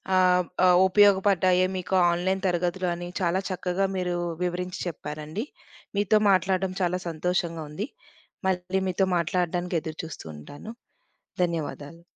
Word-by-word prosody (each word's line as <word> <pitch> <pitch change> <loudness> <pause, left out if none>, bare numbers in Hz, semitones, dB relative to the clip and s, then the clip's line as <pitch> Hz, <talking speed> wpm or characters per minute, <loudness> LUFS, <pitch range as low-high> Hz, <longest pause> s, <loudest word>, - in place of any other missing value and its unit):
ఆహ్, 180 -1 +4 0.2
ఆహ్, 180 -1 +6
ఉపయోగపడ్డాయే 190 -2 +4
మీకు 185 +1 -2 0.2
ఆన్‌లైన్ 185 +2 0
తరగతులు 180 +1 0
అని, 175 +1 -6
చాలా 180 0 +1
చక్కగా 185 +1 -1
మీరు 180 -1 -1 0.3
వివరించి 180 +1 -3
చెప్పారండి. 155 +4 -5 0.5
మీతో 205 +1 +4
మాట్లాడడం 190 0 +1
చాలా 180 0 +1
సంతోషంగా 170 0 -1
ఉంది. 195 - -4 0.6
మళ్ళీ 185 +1 0
మీతో 190 +1 +1
మాట్లాడడానికి 175 0 0
ఎదురుచూస్తూ 160 - -7
ఉంటాను. 145 - -10 0.7
ధన్యవాదాలు. 165 -1 -4
180 Hz, 115 wpm, -26 LUFS, 170-185 Hz, 0.7 s, ఆహ్